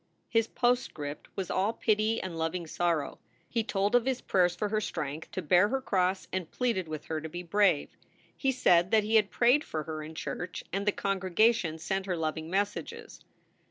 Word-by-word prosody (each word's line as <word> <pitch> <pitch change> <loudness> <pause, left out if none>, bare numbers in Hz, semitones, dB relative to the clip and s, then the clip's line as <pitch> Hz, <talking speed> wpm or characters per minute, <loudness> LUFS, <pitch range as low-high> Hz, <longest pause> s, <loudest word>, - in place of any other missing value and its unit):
His 225 -1 +2
postscript 160 - -1
was 190 -2 -3
all 200 +4 +1
pity 220 0 +1
and 185 -3 -5
loving 165 +2 -2
sorrow; 165 -2 -1 0.3
he 230 -2 -1
told 205 -3 0
of 245 -1 +4
his 260 -1 0
prayers 180 -2 +2
for 205 +4 -2
her 215 0 0
strength 155 -5 -4
to 185 - -4
bear 180 +5 +5
her 270 - 0
cross 190 -6 0
and 185 -3 -2
pleaded 230 -9 -1
with 155 -1 -6
her 160 -1 -3
to 160 - -6
be 175 +3 -6
brave. 180 -3 +2 0.4
He 270 - +1
said 180 -9 +4
that 220 0 +4
he 215 +2 -2
had 215 -2 +5
prayed 250 +5 +4
for 155 -1 -4
her 155 0 -5
in 155 +1 -8
church 175 +2 -5
and 200 +2 -2
the - - +5
congregation 195 -2 +1
sent 190 +4 -2
her 180 -2 -1
loving 160 0 -3
messages. 200 +3 -3
190 Hz, 195 wpm, -29 LUFS, 165-215 Hz, 0.4 s, bear